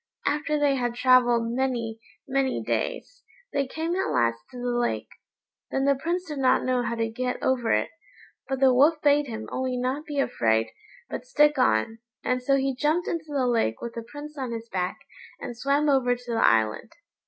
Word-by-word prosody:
After 300 Hz, +1 st, 0 dB
they 285 Hz, -2 st, +2 dB
had 240 Hz, -2 st, -1 dB
travelled 240 Hz, -2 st, +4 dB
many, 240 Hz, -3 st, -2 dB, 0.3 s
many 270 Hz, -1 st, 0 dB
days, -, -, -3 dB, 0.3 s
they 280 Hz, -1 st, 0 dB
came 320 Hz, +5 st, -3 dB
at 380 Hz, -, 0 dB
last 115 Hz, 0 st, +1 dB
to 250 Hz, -, -11 dB
the 245 Hz, 0 st, -2 dB
lake. 240 Hz, 0 st, -1 dB, 0.6 s
Then 270 Hz, 0 st, 0 dB
the 280 Hz, -, +5 dB
Prince 340 Hz, +6 st, -2 dB
did 300 Hz, -4 st, -5 dB
not 260 Hz, -1 st, +3 dB
know 255 Hz, -1 st, +1 dB
how 235 Hz, -1 st, -2 dB
to 225 Hz, -1 st, 0 dB
get 250 Hz, +3 st, -3 dB
over 245 Hz, -3 st, +1 dB
it, -, -, +1 dB, 0.6 s
but 270 Hz, -1 st, -1 dB
the 265 Hz, -1 st, +5 dB
Wolf 295 Hz, +5 st, +4 dB
bade 290 Hz, 0 st, +4 dB
him 220 Hz, -2 st, -6 dB
only 255 Hz, -1 st, -2 dB
not 260 Hz, +5 st, -2 dB
be 290 Hz, -2 st, -2 dB
afraid, 110 Hz, -, +1 dB, 0.4 s
but -, -, -6 dB
stick 295 Hz, -, +3 dB
on, 165 Hz, -, +2 dB, 0.2 s
and 250 Hz, 0 st, 0 dB
so 275 Hz, +2 st, +2 dB
he 270 Hz, 0 st, +1 dB
jumped 305 Hz, +6 st, 0 dB
into 335 Hz, -2 st, -2 dB
the 275 Hz, -3 st, +1 dB
lake 230 Hz, -, +1 dB
with 235 Hz, -1 st, -6 dB
the 230 Hz, -, -5 dB
Prince 290 Hz, +5 st, -9 dB
on 255 Hz, -3 st, -3 dB
his 230 Hz, 0 st, -6 dB
back, 180 Hz, -1 st, -2 dB, 0.4 s
and 240 Hz, -, -6 dB
swam 280 Hz, +5 st, +1 dB
over 260 Hz, -3 st, +3 dB
to 245 Hz, 0 st, -8 dB
the 225 Hz, -, +1 dB
island. 110 Hz, -1 st, +2 dB
255 Hz, 195 wpm, -26 LUFS, 235-290 Hz, 0.6 s, the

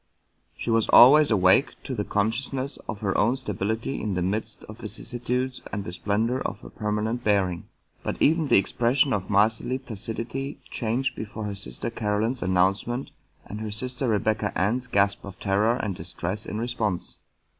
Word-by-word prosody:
She 120 Hz, -, -2 dB
was 115 Hz, -1 st, +2 dB
always 145 Hz, +5 st, +8 dB
awake 105 Hz, +5 st, +4 dB
to 130 Hz, -, -4 dB
the 105 Hz, -4 st, -1 dB
con 105 Hz, +2 st, +1 dB
sciousness 135 Hz, +3 st, -4 dB
of 105 Hz, -, -4 dB
her 100 Hz, -3 st, 0 dB
own 120 Hz, +5 st, +3 dB
stability 110 Hz, +1 st, -2 dB
in 105 Hz, -3 st, -2 dB
the 90 Hz, -, 0 dB
midst 105 Hz, +3 st, -2 dB
of 110 Hz, +1 st, -11 dB
vicissitudes 125 Hz, +3 st, -3 dB
and 100 Hz, 0 st, -3 dB
the 90 Hz, -, -6 dB
splendor 110 Hz, +7 st, 0 dB
of -, -, -4 dB
her -, -, -11 dB
permanent 105 Hz, +3 st, -2 dB
bearing. 95 Hz, -4 st, +1 dB, 0.3 s
But -, -, -4 dB
even 160 Hz, 0 st, +3 dB
her -, -, +5 dB
expression 120 Hz, +7 st, +3 dB
of 95 Hz, -2 st, -2 dB
masterly 110 Hz, +5 st, +2 dB
placidity 125 Hz, +3 st, -4 dB
changed 125 Hz, +3 st, -1 dB
be -, -, -4 dB
fore 110 Hz, +1 st, -7 dB
her 105 Hz, -1 st, -3 dB
sister 100 Hz, -, -3 dB
Caroline's 110 Hz, +3 st, 0 dB
announcement 95 Hz, +7 st, +1 dB, 0.3 s
and 105 Hz, +1 st, -7 dB
her 110 Hz, -, -3 dB
sister 125 Hz, +4 st, -1 dB
Re 110 Hz, -, +3 dB
becca 105 Hz, 0 st, -1 dB
Ann's 120 Hz, +7 st, 0 dB
gasp 100 Hz, -2 st, +2 dB
of 100 Hz, -2 st, -10 dB
terror 105 Hz, +4 st, +2 dB
and 105 Hz, -6 st, -3 dB
distress 95 Hz, +6 st, -4 dB
in 105 Hz, -, -4 dB
response. 110 Hz, -5 st, -2 dB
110 Hz, 175 wpm, -26 LUFS, 100-125 Hz, 0.3 s, always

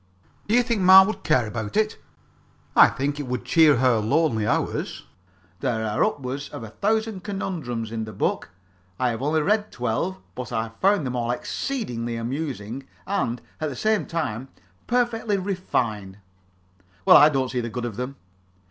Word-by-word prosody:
"Do 215 Hz, -, +2 dB
you 245 Hz, -, +5 dB
think 235 Hz, -4 st, -1 dB
ma 190 Hz, +1 st, +9 dB
would 215 Hz, +3 st, -4 dB
care 130 Hz, -7 st, +3 dB
about 110 Hz, -, -4 dB
it?" 215 Hz, 0 st, +1 dB, 0.8 s
"I -, -, +9 dB
think 145 Hz, +2 st, -2 dB
it 145 Hz, -, -4 dB
would 125 Hz, -1 st, -3 dB
cheer 160 Hz, -3 st, +5 dB
her 125 Hz, -2 st, +3 dB
lonely 115 Hz, -2 st, +1 dB
hours. -, -, -2 dB, 0.5 s
There 110 Hz, +3 st, -1 dB
are 105 Hz, -1 st, +1 dB
upwards 135 Hz, +1 st, -3 dB
of 145 Hz, -5 st, -8 dB
a 110 Hz, -, -7 dB
thousand 220 Hz, -, -1 dB
conundrums 150 Hz, -, -4 dB
in 110 Hz, -1 st, -3 dB
the 110 Hz, -, -8 dB
book. 100 Hz, -, -2 dB, 0.5 s
I 125 Hz, -, +1 dB
have 115 Hz, +1 st, -5 dB
only 150 Hz, +2 st, +1 dB
read 210 Hz, +4 st, +1 dB
twelve, 125 Hz, +11 st, -2 dB, 0.2 s
but 125 Hz, 0 st, -6 dB
I 115 Hz, -1 st, -1 dB
found 190 Hz, -, +1 dB
them 125 Hz, -1 st, -3 dB
all 120 Hz, -1 st, -1 dB
exceedingly 120 Hz, -, -3 dB
amusing, 130 Hz, 0 st, -4 dB, 0.2 s
and, 125 Hz, -, -2 dB, 0.2 s
at 155 Hz, -, -1 dB
the 135 Hz, -, -6 dB
same 215 Hz, -, +1 dB
time, 130 Hz, -7 st, -3 dB, 0.4 s
perfectly 235 Hz, -4 st, +1 dB
refined." 120 Hz, -, -2 dB, 0.9 s
"Well, -, -, +8 dB
I 150 Hz, +1 st, +8 dB
don't 135 Hz, -3 st, -1 dB
see 125 Hz, -, -1 dB
the 120 Hz, -, -4 dB
good 120 Hz, +2 st, -4 dB
of 115 Hz, -4 st, -5 dB
them." 125 Hz, +4 st, -4 dB
135 Hz, 170 wpm, -24 LUFS, 115-190 Hz, 0.9 s, ma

